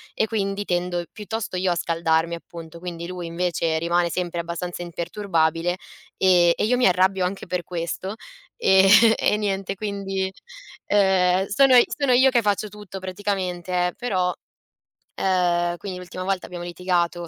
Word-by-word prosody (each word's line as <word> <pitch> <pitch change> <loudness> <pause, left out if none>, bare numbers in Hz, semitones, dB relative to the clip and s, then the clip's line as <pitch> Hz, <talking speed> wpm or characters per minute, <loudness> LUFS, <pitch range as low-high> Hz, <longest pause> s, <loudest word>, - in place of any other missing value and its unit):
e - - +2
quindi 200 -2 -2
tendo 175 -1 -1
piuttosto 210 -2 -5
io 185 0 +1
a - - +1
scaldarmi 165 0 0
appunto, 170 -1 -9
quindi 170 -1 -6
lui 180 -1 -6
invece 170 -1 -1
rimane 170 +1 +1
sempre 175 0 -3
abbastanza 170 +1 -5
imperturbabile 170 -1 -1 0.4
e 175 -2 +5
e - - 0
io 245 +4 +2
mi 250 - +4
arrabbio 185 +1 +2
anche 190 +2 -4
per 180 0 -3
questo 180 +3 -4 0.4
e 190 - +5 0.3
e 210 - +2
niente 195 -2 -2
quindi 195 -2 -3 0.6
ehm, 190 -2 +3
sono 260 +6 +5 0.2
sono 280 -4 +2
io 260 +2 +6
che 240 -2 +3
faccio 205 0 0
tutto 205 -1 -9
praticamente, 185 -2 -2
eh, 180 - -4
però 185 -7 0 0.8
ehm, 175 -2 +1
quindi 190 -1 -6
l'ultima 180 0 -7
volta 190 -1 -1
abbiamo 175 -1 -7
litigato, 175 -1 -1
180 Hz, 150 wpm, -23 LUFS, 175-195 Hz, 0.8 s, io